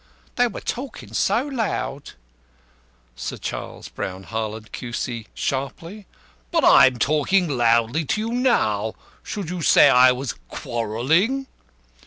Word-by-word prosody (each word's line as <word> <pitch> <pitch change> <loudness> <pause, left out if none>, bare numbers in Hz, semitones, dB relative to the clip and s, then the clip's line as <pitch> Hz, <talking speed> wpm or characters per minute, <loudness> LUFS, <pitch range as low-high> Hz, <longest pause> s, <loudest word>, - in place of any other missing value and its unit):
"They 245 0 +3
were 225 - -7
talkin' 260 +2 -6
so 245 - +1
loud." 220 - -3 1.0
Sir - - -5
CHARLES - - -6
BROWN 95 +1 -6
HARLAND, 110 0 -5
Q.C. 120 -2 -5
(sharply): 165 +9 -4 0.4
"But - - +2
I'm 130 -1 +7
talking 155 +8 +2
loudly 120 +2 +2
to 215 - -1
you 225 +1 -3
now. 110 - +1 0.3
Should 195 -5 -5
you 180 -1 -4
say 145 - +6
I 125 0 +7
was 125 0 -3 0.2
quarrelling?" 140 - 0
140 Hz, 120 wpm, -22 LUFS, -, 1.0 s, I'm